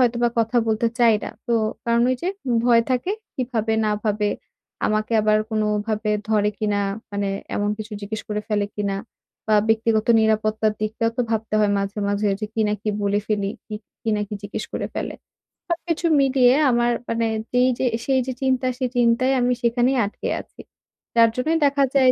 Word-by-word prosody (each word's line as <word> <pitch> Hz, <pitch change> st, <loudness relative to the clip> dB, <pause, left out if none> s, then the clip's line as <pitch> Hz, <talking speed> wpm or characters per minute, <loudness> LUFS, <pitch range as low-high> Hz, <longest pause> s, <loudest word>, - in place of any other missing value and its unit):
হয়তোবা 240 Hz, -1 st, +3 dB
কথা 230 Hz, +2 st, +1 dB
বলতে 220 Hz, +1 st, +1 dB
চাই 235 Hz, -2 st, +5 dB
না। -, -, -5 dB, 0.2 s
তো 235 Hz, -, +1 dB, 0.3 s
কারণ 235 Hz, 0 st, +2 dB
ওই 255 Hz, -, +1 dB
যে 360 Hz, -, 0 dB, 0.4 s
ভয় 235 Hz, -1 st, +5 dB
থাকে। 255 Hz, +10 st, 0 dB, 0.2 s
কি 255 Hz, -, -1 dB
ভাবে 220 Hz, -1 st, 0 dB
না 210 Hz, -, +1 dB
ভাবে! 210 Hz, 0 st, +1 dB, 0.6 s
আমাকে 215 Hz, +1 st, 0 dB
আবার 215 Hz, 0 st, +3 dB
কোনভাবে 215 Hz, 0 st, 0 dB, 0.2 s
ধরে 210 Hz, -1 st, +2 dB
কিনা। 205 Hz, -1 st, 0 dB, 0.3 s
মানে 200 Hz, -1 st, -1 dB, 0.3 s
এমন 205 Hz, 0 st, 0 dB
কিছু 215 Hz, 0 st, -7 dB
জিজ্ঞেস 215 Hz, +2 st, -5 dB
করে 210 Hz, 0 st, -1 dB
ফেলে 205 Hz, -1 st, +1 dB
কিনা 200 Hz, -2 st, -1 dB, 0.5 s
বা 215 Hz, -, +5 dB
ব্যক্তিগত 225 Hz, -1 st, +2 dB
নিরাপত্তার 215 Hz, 0 st, +1 dB
দিকটাও 225 Hz, +2 st, 0 dB
তো -, -, +3 dB
ভাবতে 220 Hz, -1 st, -1 dB
হয় 205 Hz, -1 st, +3 dB
মাঝে, 200 Hz, +1 st, -3 dB
মাঝে 205 Hz, +1 st, +1 dB
যে 215 Hz, -, -2 dB
কি 225 Hz, -, 0 dB
না 210 Hz, -, +1 dB
কি -, -, -2 dB
বলে 205 Hz, +1 st, +1 dB
ফেলি, 205 Hz, -2 st, 0 dB, 0.2 s
কি 215 Hz, -, -6 dB, 0.3 s
কি 225 Hz, -, -1 dB
না -, -, -1 dB
কি 210 Hz, -, -5 dB
জিজ্ঞেস 205 Hz, -, -5 dB
করে -, -, -2 dB
ফেলে। -, -, -3 dB, 0.5 s
সবকিছু 340 Hz, 0 st, -2 dB, 0.2 s
মিলিয়ে 260 Hz, -2 st, +4 dB, 0.2 s
আমার 240 Hz, 0 st, +2 dB, 0.2 s
মানে 230 Hz, 0 st, 0 dB, 0.2 s
যেই 250 Hz, +1 st, +4 dB
যে 260 Hz, -, +1 dB, 0.2 s
সেই 265 Hz, -1 st, +2 dB
যে 260 Hz, -, -2 dB
চিন্তা, 260 Hz, -1 st, +1 dB
সেই 255 Hz, -1 st, -1 dB
চিন্তায় 245 Hz, +3 st, +3 dB
আমি 250 Hz, 0 st, +2 dB
সেখানেই 245 Hz, +2 st, +2 dB
আটকে 205 Hz, -, -5 dB
আছি। -, -, -15 dB, 0.5 s
যার 230 Hz, -1 st, +6 dB
জন্যই 315 Hz, +6 st, +1 dB
দেখা 280 Hz, 0 st, +3 dB
যায় 260 Hz, -2 st, +6 dB
225 Hz, 185 wpm, -22 LUFS, 210-245 Hz, 0.6 s, যার